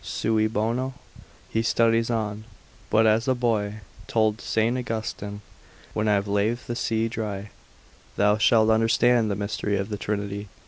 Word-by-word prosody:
cui 110 0 +2
bono? 115 +5 -1 0.6
He 110 - +1
studies 115 0 +2
on, 110 -2 -2 0.4
but 110 +1 +4
as 110 +2 +3
the 130 -1 +2
boy 110 -4 -1 0.3
told 110 -1 +1
St. 120 +3 0
Austin, 105 -2 -4 0.5
when 110 0 0
I 105 - +4
have 100 0 -1
laved 105 +5 0
the 120 - -4
sea 115 -1 0
dry, 105 -3 -5 0.6
thou 105 +1 +3
shalt 110 -1 +4
understand 115 +1 +3
the 100 - -1
mystery 100 0 -2
of 100 +2 -3
the 105 - -3
Trinity. 100 0 -3
110 Hz, 150 wpm, -25 LUFS, 105-115 Hz, 0.6 s, but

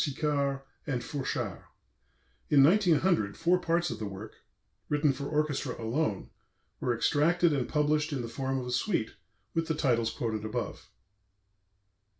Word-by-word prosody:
Sicard 140 -1 0 0.3
and 125 -4 -1
Fourchard. 140 -3 -3 0.9
In 140 -2 +7
1900 170 - +3
four 175 +2 +3
parts 170 0 0
of - - -5
the 110 - -3
work, 100 +2 -8 0.6
written 150 -1 +3
for 140 +2 -5
orchestra 150 -4 -1
alone, 115 -2 -1 0.5
were 120 - 0
extracted 165 +6 +3
and 135 -4 -1
published 150 +1 +1
in 135 -4 -2
the - - -4
form 135 +2 -2
of 130 - -3
a 125 - -4
suite, 125 - 0 0.4
with 165 0 0
the 160 - 0
titles 120 -6 +2
quoted 110 -2 -3
above. 115 +3 -4
140 Hz, 145 wpm, -30 LUFS, 120-160 Hz, 0.9 s, In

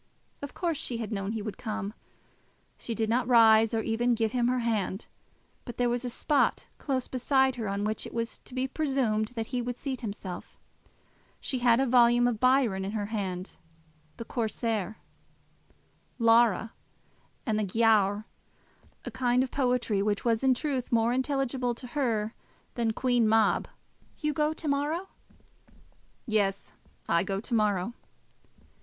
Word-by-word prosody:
Of 285 - -7
course 335 -5 -1
she 240 - -2
had 225 -1 -5
known 195 -2 -2
that - - -2
he 220 - -3
would 215 -1 -6
come. 215 -2 -4 0.9
She 230 - -4
did 220 0 0
not 240 +2 +1
rise, 225 -2 +6
or 225 - 0
even 235 +2 +1
give 225 -1 0
him 240 -1 +1
her 255 +1 +1
hand, 215 -3 -1 0.6
but 240 - -8
there 245 -1 +2
was 245 +1 -1
a 250 - -2
spot 285 +4 +1
close 260 -3 -2
beside 265 +1 +2
her 225 -3 -3
on 200 +1 -2
which 215 +1 -2
it - - -10
was 230 0 -3
to 255 - -10
be 260 +1 0
presumed 265 -7 0
that 225 -1 -2
he 250 - 0
would 245 0 -3
seat 265 0 -5
himself. 200 -5 -7 0.8
She 260 - -2
had 240 -1 +4
a 270 - +3
volume 240 -1 +5
of 235 -3 -1
Byron 255 -6 +3
in 195 +2 -4
her 210 -2 -2
hand, 185 -3 -3 0.6
the 230 - -6
Corsair, 220 -3 -2 1.2
Lara, 230 -2 +4 0.7
and 215 -2 0
the - - +1
Giaour, 210 0 +2 0.8
a - - -5
kind 250 0 +2
of 260 - -5
poetry 245 -6 +1
which 205 +2 -1
was 230 +1 +1
in 260 -1 +4
truth 265 -2 -2
more 230 0 +3
intelligible 260 -2 -1
to 250 - -11
her 235 -5 -1 0.4
than 230 -2 0
Queen 245 -1 +2
Mab. 220 -1 +3 0.5
"You 300 -1 -1
go 300 +2 +1
to 315 0 -6
morrow?" 300 +7 -1 1.2
"Yes; 200 -4 -1 0.3
I 170 0 +3
go 195 0 -2
to 230 - -7
morrow." 210 -1 +1
235 Hz, 160 wpm, -28 LUFS, 215-255 Hz, 1.2 s, rise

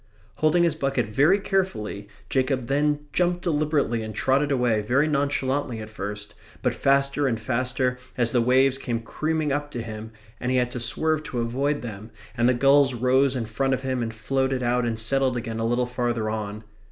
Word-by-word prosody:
Holding 155 +3 +3
his 170 -3 +3
bucket 135 -5 0
very 145 - +3
carefully, 180 - -2 0.2
Jacob 130 -1 0
then 145 +2 +1
jumped 175 0 +1
deliberately 150 -7 +1
and 110 -1 -6
trotted 140 +2 +1
away 120 -5 +2
very 130 +8 +2
nonchalantly 140 -3 0
at 110 0 -8
first, 105 0 -6 0.3
but - - +2
faster 140 +1 +2
and 115 -3 -1
faster 125 +2 -1 0.2
as 120 -2 +2
the 120 - +3
waves 130 +2 +3
came 120 -3 -2
creaming 155 +5 -1
up 145 +1 -1
to 120 -5 -5
him 110 0 -7 0.3
and 125 - -2
he 130 - +2
had 125 -1 +1
to 125 - -4
swerve 155 +6 0
to 125 - -4
avoid 135 +5 -1
them, 110 -2 -7 0.3
and 120 0 +3
the 125 - +3
gulls 135 +1 +4
rose 130 +3 +3
in 120 -3 -2
front 135 +5 0
of 130 - -8
him 130 -1 -1
and 115 -1 -3
floated 130 +3 -1
out 120 0 +1
and 115 -1 -2
settled 130 +3 +1
again 115 -1 -4
a 115 - 0
little 120 +1 +1
farther 120 -3 -1
on. 105 0 -4
130 Hz, 190 wpm, -25 LUFS, 115-140 Hz, 0.3 s, gulls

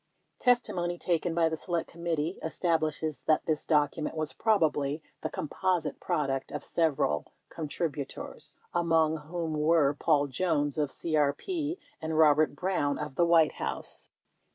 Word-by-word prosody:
Testimony 185 -9 +1
taken 170 -1 0
by 165 -1 +4
the 160 - -1
Select 170 +1 -2
Committee 170 0 -2
establishes 160 -4 -1
that 155 - +3
this 155 -2 -1
docu 150 0 +2
ment 155 - -3
was 155 -1 -2
probably 155 -8 +1 0.2
the - - -2
composite 180 +3 -1
product 135 -3 -1
of - - -4
several 135 - +1 0.2
contributors, 150 -2 -5 0.2
among 165 -2 +3
whom 160 +1 -4
were 150 -1 +3
Paul 145 0 +2
Jones 145 0 0
of 145 -2 +1
CRP 170 - -1 0.2
and 160 0 -2
Robert 155 -1 +5
Brown 160 -5 0
of 150 -2 -5
the 170 +5 +2
White 165 -2 +5
House. - - -4
160 Hz, 135 wpm, -29 LUFS, 150-170 Hz, 0.2 s, Robert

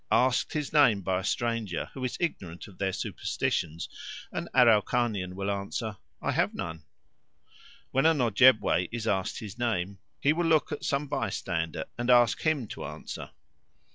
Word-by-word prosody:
Asked 125 0 +3
his 150 -2 -3
name 125 -10 +5
by 95 0 0
a - - -6
stranger, 115 -5 -2
who 130 - -6
is 125 - -2
ignorant 90 - -3
of 100 - -16
their 95 -1 0
superstitions, 80 -3 -2 0.4
an - - -4
Araucanian 110 -5 +3
will 100 +1 -2
answer, 100 +2 -3 0.2
"I - - -1
have - - +1
none." 80 -2 -5 1.1
When 135 +4 +3
an 160 -2 +3
Ojebway 110 -6 +4
is 115 -1 -4
asked 95 -4 0
his 110 +1 -8
name, 100 -5 -1 0.2
he 145 - +3
will 170 +1 0
look 160 -1 +3
at 150 - -4
some 140 +1 0
bystander 80 - -2
and 120 +1 -1
ask 120 -2 +5
him 155 -6 +1
to - - -7
answer. - - -7
115 Hz, 160 wpm, -28 LUFS, 95-130 Hz, 1.1 s, name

